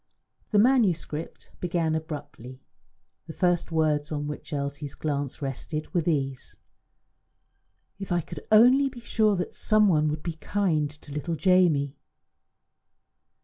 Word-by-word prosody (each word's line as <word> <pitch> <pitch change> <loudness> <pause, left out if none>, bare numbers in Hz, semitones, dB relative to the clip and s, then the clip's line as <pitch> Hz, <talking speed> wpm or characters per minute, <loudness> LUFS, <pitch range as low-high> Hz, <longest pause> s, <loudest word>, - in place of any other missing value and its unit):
The 210 - +2
manuscript 200 - +1
began 170 -2 0
abruptly. 145 -5 -6 0.7
The 160 - -7
first 175 -1 0
words 155 -2 +1
on 145 -1 -2
which 150 +3 -7
Elsie's 140 0 -4
glance 145 -2 -3
rested 150 +4 -5
were 175 - +2
these: 135 -5 -2 1.4
"If 195 -1 -6
I 175 0 +2
could 165 0 -8
only 250 +6 +6
be 245 -2 -11
sure 215 -3 +2
that 180 -1 -3
some 215 -1 +3
one 155 -5 +3
would 150 0 -3
be 170 -2 -4
kind 160 -7 0
to 150 0 -14
little 150 +4 -3
Jamie!" 160 -6 +3
160 Hz, 130 wpm, -26 LUFS, 145-185 Hz, 1.4 s, only